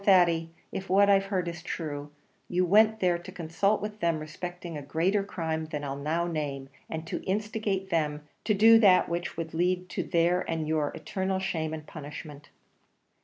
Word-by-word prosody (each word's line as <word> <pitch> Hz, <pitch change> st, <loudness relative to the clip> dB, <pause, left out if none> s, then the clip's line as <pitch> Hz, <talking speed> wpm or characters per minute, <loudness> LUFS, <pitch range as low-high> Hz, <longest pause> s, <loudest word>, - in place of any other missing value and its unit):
Thady, 170 Hz, -4 st, +4 dB, 0.2 s
if 190 Hz, -, -5 dB
what 200 Hz, +1 st, +5 dB
I've 195 Hz, 0 st, +4 dB
heard 190 Hz, -3 st, -1 dB
is 170 Hz, 0 st, -5 dB
true, 150 Hz, -4 st, -5 dB, 0.4 s
you 180 Hz, +1 st, +1 dB
went 215 Hz, +4 st, +5 dB
there 175 Hz, -2 st, +2 dB
to 175 Hz, -, -10 dB
consult 180 Hz, +6 st, 0 dB
with 210 Hz, 0 st, -5 dB
them 170 Hz, -2 st, +1 dB
respecting 170 Hz, +2 st, -6 dB
a 145 Hz, -, -4 dB
greater 170 Hz, +8 st, +1 dB
crime 160 Hz, -5 st, -3 dB
than 150 Hz, -2 st, -4 dB
I'll 135 Hz, -1 st, -3 dB
now 155 Hz, +5 st, -1 dB
name, 145 Hz, -5 st, -3 dB, 0.2 s
and 160 Hz, 0 st, -4 dB
to 165 Hz, -, -4 dB
instigate 205 Hz, -1 st, -1 dB
them 150 Hz, -2 st, -1 dB, 0.2 s
to 215 Hz, -, +3 dB
do 225 Hz, +3 st, +8 dB
that 190 Hz, -4 st, +6 dB
which 170 Hz, 0 st, -3 dB
would 165 Hz, -1 st, -4 dB
lead 180 Hz, +2 st, 0 dB
to -, -, -2 dB
their 175 Hz, +1 st, +2 dB
and 160 Hz, -2 st, -1 dB
your 155 Hz, -2 st, +1 dB
eternal 190 Hz, 0 st, -2 dB
shame 170 Hz, -5 st, -2 dB
and 155 Hz, -1 st, -6 dB
punishment." 145 Hz, -1 st, -9 dB
170 Hz, 180 wpm, -28 LUFS, 155-190 Hz, 0.4 s, do